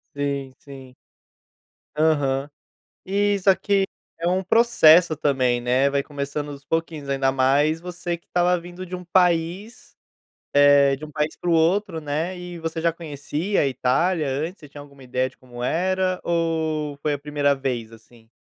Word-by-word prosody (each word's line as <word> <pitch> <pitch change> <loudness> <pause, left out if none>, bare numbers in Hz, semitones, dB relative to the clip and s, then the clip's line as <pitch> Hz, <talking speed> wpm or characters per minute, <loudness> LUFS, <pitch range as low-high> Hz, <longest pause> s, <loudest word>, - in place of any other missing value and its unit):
Sim. 140 -2 -3
Sim. 135 -2 -13 1.0
Aham. 145 -3 +1 0.6
E 205 +2 +1
isso 195 0 -1
aqui 195 +1 +3 0.4
é 170 - 0
um 185 +1 +1
processo 180 -7 +5
também, 130 -5 +1
né, 125 +3 +2
vai 140 0 0
começando 145 +1 -5
dos 140 -1 -12
pouquinhos, 165 -2 -3
ainda 135 -1 +1
mais 140 +4 +2
você 175 0 -4
que 170 - -38
estava 180 0 +2
vindo 175 +2 -9
de 185 0 -8
um 180 - -6
país, 180 +4 0 0.6
eh, 145 -1 +5
de 150 +3 -9
um 150 - -12
país 150 +1 -2
pro 175 - -2
outro, 165 +1 +2
né, 155 +5 -3
e 180 -1 -8
você 165 0 -4
já 170 0 +2
conhecia 160 +4 -3
a 140 - +2
Itália 150 +6 +1
antes? 155 +8 -3
Você 150 - -13
tinha 145 +1 -11
alguma 140 -1 -15
ideia 130 +1 -1
de - - -26
como 120 -1 -9
era, 185 +5 0
ou 160 -3 -1
foi 150 0 0
a 145 - -3
primeira 145 -1 +1
vez, 125 -5 -3
assim? 115 0 -18
155 Hz, 165 wpm, -23 LUFS, 140-175 Hz, 1.0 s, processo